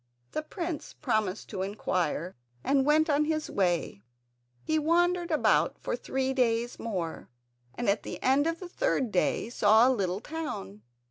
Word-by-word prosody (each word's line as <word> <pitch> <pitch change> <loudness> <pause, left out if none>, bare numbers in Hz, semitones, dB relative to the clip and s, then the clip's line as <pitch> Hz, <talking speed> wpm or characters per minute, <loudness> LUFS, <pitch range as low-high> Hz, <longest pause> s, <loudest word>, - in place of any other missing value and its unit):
The - - -2
prince 335 -1 -5
promised 215 -5 -1
to 195 -4 -4
inquire, 185 -3 -2 0.3
and 275 0 +2
went 310 +1 +4
on 300 0 +2
his 310 0 -2
way. 175 - 0 0.6
He 315 0 +1
wandered 350 +3 +2
about 215 - +2
for - - -3
three 265 +2 -2
days 240 -2 0
more, 180 -8 -4 0.5
and 240 - -3
at 200 +2 +2
the - - -7
end 275 +4 +3
of 330 0 -2
the 365 - -7
third 350 - 0
day 185 +3 +1
saw 220 +1 +5
a - - +4
little 190 -4 -1
town. 215 - -6
245 Hz, 155 wpm, -29 LUFS, 195-310 Hz, 0.6 s, saw